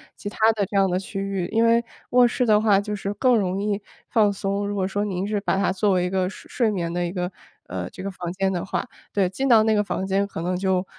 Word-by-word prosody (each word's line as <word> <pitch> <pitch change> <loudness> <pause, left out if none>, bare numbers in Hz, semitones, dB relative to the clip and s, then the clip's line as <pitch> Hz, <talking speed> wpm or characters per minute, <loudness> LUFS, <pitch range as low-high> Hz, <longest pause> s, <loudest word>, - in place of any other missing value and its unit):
其 205 - -6
它 - - -13 0.2
的 210 -2 -1
这 200 - -2
样 195 -1 +4
的 180 0 0
区 195 +1 -6
域。 195 -3 -2
因 225 +1 +3
为 230 +1 +4 0.3
卧 245 0 +6
室 250 +1 0
的 215 -1 +4
话， 205 -3 +4
就 210 +1 -3
是 200 0 -3
更 250 +3 +3
容 190 -2 0
易 205 0 -1 0.3
放 210 -3 +4
松。 200 +1 -2
如 205 - -3
果 190 -1 0
说 205 +1 -1
您 190 -1 -2
是 210 -1 -1
把 195 - 0
它 200 - +2
作 200 +2 +1
为 180 -1 +2
一 180 - -1
个 185 -1 +1
睡 - - -12
睡 235 -4 +1
眠 170 -4 -2
的 175 - -1
一 175 - -2
个 180 0 -3 0.3
呃， 90 0 -5
这 185 - -9
个 195 - -3
房 175 -2 -5
间 195 0 0
的 175 -1 -2
话， 195 +5 -3 0.2
对， 195 -2 +2
进 265 +9 -2
到 225 -3 +6
那 220 0 +3
个 210 0 +2
房 190 - -3
间， 195 +1 +1
可 180 - -6
能 180 +2 -1
就 190 0 0
195 Hz, 300 characters per minute, -24 LUFS, 185-210 Hz, 0.3 s, 卧